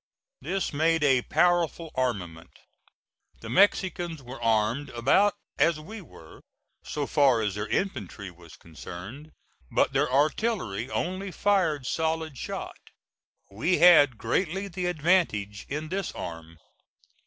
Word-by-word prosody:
This 180 +6 -2
made 160 +1 +2
a 135 -3 +4
powerful 170 0 +1
armament. 95 -11 -3 0.8
The 115 - -7
Mexicans 175 -2 +2
were 125 0 -9
armed 115 +4 +1
about 140 - +3 0.2
as 165 -2 +3
we 205 +8 -9
were 80 - -15 0.4
so 145 -1 -3
far 135 -5 +3
as 105 -3 -1
their 105 +2 -4
infantry 100 - -3
was 85 -2 -15
concerned, 95 - -10 0.4
but - - +1
their - - +1
artillery 140 - 0
only 185 +6 -3
fired 175 -9 +1
solid 160 0 -2
shot. - - -6 0.7
We 125 - +1
had 150 -8 +7
greatly 185 - -1
the 180 -1 -3
advantage 155 - 0
in 155 +2 -4
this 195 0 -3
arm. 80 -1 -8
145 Hz, 120 wpm, -27 LUFS, 110-175 Hz, 0.8 s, had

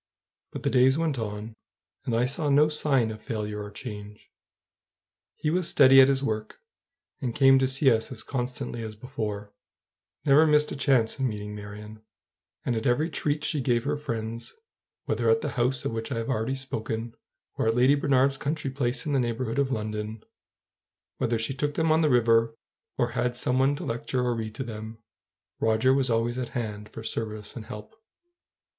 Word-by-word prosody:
But - - -7
the - - +1
days 130 +2 +5
went 160 -5 0
on, 105 0 -5 0.5
and 115 - 0
I 120 +2 +3
saw 140 +3 -1
no 145 +2 +5
sign 135 -7 +1
of 110 0 -9
failure 105 -2 -4
or 105 - -7
change. 105 -2 -9 1.0
He 150 - -1
was 175 0 +1
steady 135 -1 +7
at 130 - +7
his 135 0 +1
work, 110 -3 -3 0.6
and 120 -3 -2
came 135 -2 +6
to 130 - +2
see 135 +1 +4
us 110 +1 0
as 110 -3 -3
constantly 125 -2 -4
as 110 -1 -6
before; 105 -4 -5 0.7
never 150 +2 +6
missed 150 0 +3
a - - -3
chance 135 -4 +2
of 135 - +1
meeting 105 -3 -4
Marion: 105 +1 -9 0.6
and 120 - 0
at 110 +3 -1
every 150 +7 +1
treat 150 0 -1
she 150 -2 -1
gave 120 -2 +1
her 140 - 0
friends, 115 -5 -5 0.5
whether - - 0
at 455 0 +4
the - - -2
house 125 +1 0
of - - 0
which 115 +3 -4
I 120 - -1
have 115 +2 -3
already 130 +1 0
spoken, 115 -3 -4 0.4
or - - 0
at 115 - +2
Lady 125 +3 +5
Bernard's 140 -1 +2
country 145 -1 -2
place 130 0 -1
in 150 - -1
the 135 - +3
neighborhood 120 +1 -1
of 140 -2 +2
London, 110 -1 -4 0.9
whether 115 0 0
she 110 +4 -2
took 145 +2 -2
them 160 -1 +2
on 160 +1 +4
the 155 - +3
river, 115 -2 +3 0.4
or 120 - +1
had 120 0 -1
some 125 +1 0
one 135 +2 +3
to - - -7
lecture 125 +2 -2
or 125 -1 +1
read 110 -1 -5
to 135 - -3
them, 110 -1 -7 0.6
Roger 110 +4 +3
was 135 -1 +2
always 115 +2 0
at 125 - -3
hand 105 -3 -4
for 110 - -9
service 110 -2 -4
and 115 -3 -8
help. 105 0 -9
120 Hz, 190 wpm, -27 LUFS, 110-135 Hz, 1.0 s, steady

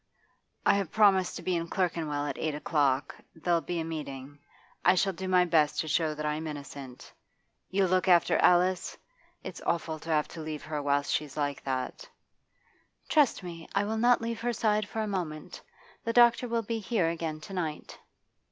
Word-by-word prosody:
'I - - +6
have 200 -4 -1
promised 195 -4 +4
to - - -7
be 185 - 0
in 170 0 -2
Clerkenwell 165 -6 -1
at - - -4
eight 155 -2 -1
o'clock. 145 -3 0 0.2
There'll 170 +1 +1
be 170 +3 -3
a - - -1
meeting. 145 -3 -7 0.4
I - - +5
shall 195 +1 +1
do 185 +2 -6
my 180 -1 +4
best 160 -4 +2
to 160 - -6
show 155 0 +1
that 150 0 -4
I 150 - +1
am 160 +1 -5
innocent. 140 -3 -9 0.6
You'll 190 -1 +1
look 185 +1 +2
after 175 -2 +5
Alice? 180 0 +3 0.5
It's - - -7
awful 160 -1 -1
to 160 - -10
have 150 -2 +2
to 165 - -8
leave 155 -2 -5
her 155 -1 -3
whilst 145 0 +1
she's 150 -2 -2
like 145 -2 -2
that.' 135 - -3 1.0
'Trust 290 - +3
me. 170 -2 -8
I 200 - +3
will 220 +2 -2
not 240 +1 +4
leave 230 -1 -3
her 240 0 0
side 215 -2 +1
for 220 - -3
a 215 - -2
moment. 165 -7 -4 0.4
The 230 - -1
doctor 240 +1 +5
will 230 -1 -1
be 225 +1 -3
here 205 -4 0
again 165 -2 -3
to 195 - -9
night. 160 -5 -4
170 Hz, 190 wpm, -29 LUFS, 150-195 Hz, 1.0 s, I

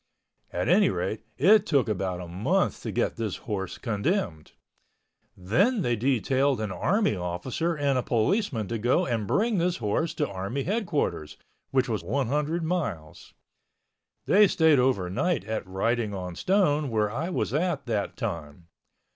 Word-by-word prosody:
At - - -2
any - - +5
rate - - -2 0.2
it 205 +7 +5
took 140 -6 +2
about 95 -4 -2
a 90 - -7
month 90 +5 0
to - - -4
get - - -1
this 110 -4 -3
horse 95 -4 -3
condemned. 105 - -2 0.8
Then 185 - +2
they 120 -4 +1
detailed 130 +3 +1
an 110 -2 -3
army 185 - +1
officer 95 - -2
and 140 -3 +1
a - - +1
policeman 120 - 0
to 115 - -2
go 120 +4 +2
and 115 -5 -2
bring 215 - +1
this 175 +1 +1
horse 120 +9 -1
to - - 0
army 100 +8 -3
headquarters, 165 - -2 0.3
which - - +1
was - - -2
100 145 - -1
miles. 130 - -4 0.9
They 205 +1 +6
stayed 160 -5 +4
over 125 -8 +2
night 155 - -1
at 110 -3 -4
Writing 105 +3 -1
on 90 -2 -5
Stone 155 - +1
where 105 -2 0
I 155 +10 -3
was 180 - -2
at 155 -2 0
that 105 -5 -2
time. 85 +1 -5
125 Hz, 155 wpm, -27 LUFS, 100-165 Hz, 0.9 s, They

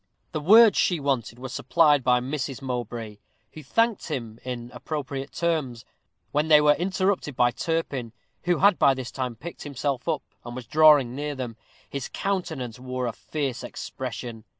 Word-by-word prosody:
The 155 - -3
words 215 +6 +7
she 180 -2 +2
wanted 130 -5 -1
were 130 +1 -6
supplied 145 +2 +3
by 125 0 +4
Mrs. 135 0 -3
Mowbray, 120 -5 -5 0.3
who 155 - -10
thanked 225 - +1
him 115 -7 -5
in 125 -1 -5
appropriate 140 -2 -5
terms, 150 -9 -1 0.5
when 150 +2 +1
they 155 -1 +8
were 150 0 +5
interrupted 185 -4 -1
by 120 0 +3
Turpin, 140 -7 -2 0.3
who 175 -1 +2
had 200 +3 +4
by 135 -1 +5
this 130 -3 -6
time 125 -3 -3
picked 160 +9 -9
himself 140 -2 -3
up, - - 0 0.2
and 120 0 -8
was 130 -2 -6
drawing 150 -5 +5
near 145 +2 -3
them. 125 -4 -5 0.3
His 140 -2 -5
countenance 160 - -3
wore 130 0 -3
a 120 - -2
fierce 140 0 -4
expression. 120 -3 -6
135 Hz, 165 wpm, -25 LUFS, 125-155 Hz, 0.5 s, they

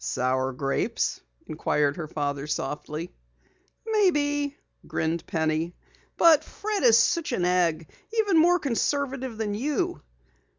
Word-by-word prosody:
"Sour 130 +1 0
grapes?" 135 +1 -1 0.2
inquired 150 -2 0
her 165 -3 -4
father 145 -1 -3
softly. 150 +3 -4 0.7
"Maybe," 295 -9 +1 0.3
grinned 160 +1 -2
Penny. 160 +1 -1 0.4
"But 320 -3 +6
Fred 420 +5 -3
is 235 -4 +6
such 305 +7 +2
an 180 -6 0
egg, 170 -3 +1 0.2
even 420 -7 +3
more 350 +2 +5
conservative 270 -3 -1
than 215 -2 -2
you." 270 +6 -1
220 Hz, 115 wpm, -26 LUFS, -, 0.7 s, But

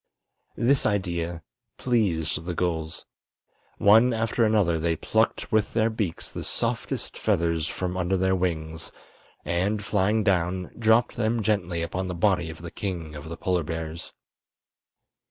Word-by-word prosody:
This 130 +3 +3
idea 85 -5 -2 0.3
pleased 85 - 0
the 90 -1 -3
gulls. 80 -2 -2 0.7
One 115 +5 +6
after 115 +1 +1
another 105 -7 +3
they 85 +1 +1
plucked - - 0
with 110 -1 +2
their 115 0 +3
beaks 105 -7 -3
the - - -5
softest - - -2
feathers 85 -1 +1
from 90 0 -3
under 90 +1 0
their 95 +1 +2
wings, 80 -3 -2 0.5
and, 95 +4 0
flying 105 +1 +2
down, 90 -1 0
dropped 115 +1 +3
then 115 0 +1
gently 90 -5 0
upon 90 +2 -3
the 90 - -4
body 90 -2 +2
of 80 +1 -9
the 85 - -6
King 85 -6 -4
of 75 +1 -8
the 85 - -6
Polar 90 0 0
Bears. 80 +1 -5
90 Hz, 140 wpm, -26 LUFS, 85-105 Hz, 0.7 s, One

